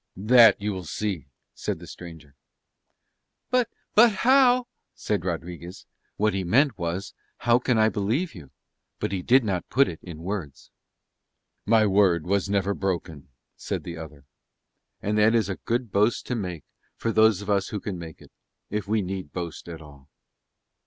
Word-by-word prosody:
"That 115 +2 +6
you 105 0 -2
will 95 -2 -6
see," 95 -10 -3 0.3
said - - -3
the - - -11
stranger. 80 -5 -11 1.2
"But, 250 -2 +2 0.2
but 230 +2 +7
how 250 +3 +4
..." - - -53
said 105 -4 -2
Rodriguez. 85 0 -6 0.3
What 105 -1 +1
he 95 -1 -1
meant 125 - +3
was, 85 +3 -3 0.2
"How 120 +1 +3
can 125 -1 +1
I 110 0 +5
believe 110 - -1
you?" 80 - -12 0.5
but - - -3
he 95 -2 -2
did 130 +7 +4
not 95 -5 -2
put 140 +1 +4
it 80 - -6
in 85 -3 -10
words. 90 -7 -6 1.0
"My 110 0 +5
word 95 -5 +3
was 100 +2 0
never 100 0 +1
broken," 90 -7 -4 0.3
said - - -4
the 85 -1 -7
other. 75 -3 -11 0.8
And 105 +1 0
that 110 +2 +4
is 110 -4 +1
a 95 - -3
good 120 -2 -2
boast 105 +4 +2
to 125 - -2
make, 90 - -5 0.3
for 115 - -2
those 110 -3 +4
of 105 - -8
us 100 -1 +1
who 105 - -4
can 95 -3 -5
make 80 -2 -10
it; - - -18 0.4
if 105 -1 -3
we 110 0 +1
need 95 -4 -5
boast 85 -2 -6
at 80 -1 -8
all. 70 -2 -16
100 Hz, 175 wpm, -25 LUFS, 85-110 Hz, 1.2 s, but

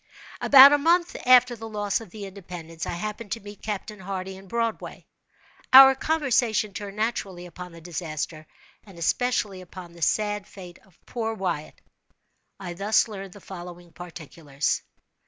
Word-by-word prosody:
About 275 +1 +9
a 290 - +3
month 340 +3 +2
after 250 -1 +6
the 225 0 -9
loss 205 0 -1
of 225 - -11
the 205 +1 -8
"Independence," 175 -4 -8
I - - -3
happened 210 +4 -6
to 230 - -5
meet 205 0 -12
Captain 210 0 -5
Hardy 190 0 -5
in 190 +1 -14
Broadway. 230 +2 -3 0.7
Our 265 0 +11
conversation 255 -8 0
turned, 200 0 -7
naturally, 200 -5 -3
upon 180 +1 -10
the 165 0 -13
disaster, 155 -2 -5 0.4
and 195 -5 -16
especially 205 +2 -1
upon 180 -1 -11
the 170 - -15
sad 210 +3 0
fate 180 -3 -12
of 190 -4 -26
poor 225 -2 -3
Wyatt. 175 -7 -4 0.8
I 175 -3 -6
thus 205 +6 +2
learned 195 -3 -8
the 205 - -14
following 175 -2 -10
particulars. 160 -4 -4
195 Hz, 155 wpm, -25 LUFS, 175-225 Hz, 0.8 s, Our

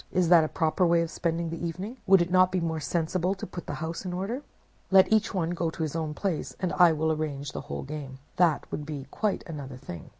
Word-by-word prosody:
Is 180 -2 +2
that 170 -2 +7
a - - 0
proper 160 +4 0
way 170 -1 +4
of 165 - -5
spending 165 0 -1
the 165 - -5
evening? 185 +9 -4
Would 190 -2 +7
it 175 - -6
not 185 0 +5
be 185 - +1
more 165 -2 -1
sensible 170 +4 0
to 195 - -6
put 175 - -8
the 145 - -3
house 165 +3 -5
in 180 -2 -4
order? 200 +9 -3 0.5
Let 190 +2 +6
each 220 0 +3
one 175 -3 -1
go 170 -1 -1
to 160 - -4
his 155 0 -3
own 155 -2 -2
place, 185 -4 -2
and 185 -2 -1
I 175 -2 +6
will 160 0 +1
arrange 145 -2 -3
the - - -5
whole - - -5
game. 140 -2 -7 0.2
That 170 -4 +3
would 150 - -3
be 145 -3 -6
quite 210 -3 -1
another 140 -5 -7
thing. 85 -10 -9
165 Hz, 245 wpm, -28 LUFS, 155-185 Hz, 0.5 s, that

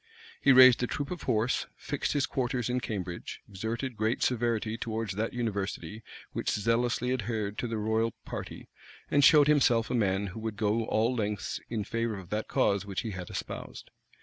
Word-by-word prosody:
He 140 - +6
raised 130 -1 +8
a 125 - +1
troop 145 +5 -4
of 180 - -4
horse; 115 0 0
fixed 145 - -2
his 145 -2 +2
quarters 125 -2 -1
in 125 - +1
Cambridge; 95 -7 -5
exerted 115 +6 -4
great 110 +3 0
severity 115 -3 0
towards 115 -3 -3
that 110 +4 -2
university 105 -1 -3 0.3
which - - -2
zealously 120 +3 +1
adhered 110 -3 -2
to 120 - -1
the 115 -1 -3
royal 110 +1 0
party; - - -7 0.4
and 145 - +4
showed 150 +1 +8
himself 125 -6 +3
a - - 0
man 100 -4 +1
who 110 - -7
would 110 -1 -4
go 110 +1 +1
all 115 +3 +1
lengths 105 -3 -2
in 110 -3 -2
favor 115 0 -2
of 95 -1 -11
that 105 +1 -2
cause 100 -1 +2
which 100 -2 -3
he 115 -3 -4
had 90 -2 -6
espoused. - - -7
115 Hz, 180 wpm, -29 LUFS, 105-125 Hz, 0.4 s, raised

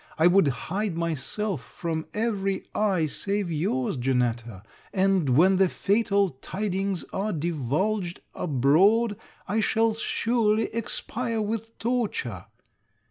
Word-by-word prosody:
I 160 - +3
would 180 -2 +5
hide 170 - -2
myself 170 +2 -2
from 160 -2 -4
every 200 -3 -1
eye 195 -6 +2
save 200 +4 -1
your's, 150 -6 -1
Janetta; 120 -5 -1 0.3
and, 190 -6 +2
when 185 +4 +5
the 190 -1 +4
fatal 200 0 +2
tidings 195 -2 -2
are 205 +3 -1
divulged 170 - -1
abroad, 180 - +3 0.3
I 215 - 0
shall 225 +1 +2
surely 225 -1 0
expire 230 +1 -3
with 225 +1 -3
torture. 245 - -2
195 Hz, 110 wpm, -26 LUFS, 160-215 Hz, 0.3 s, would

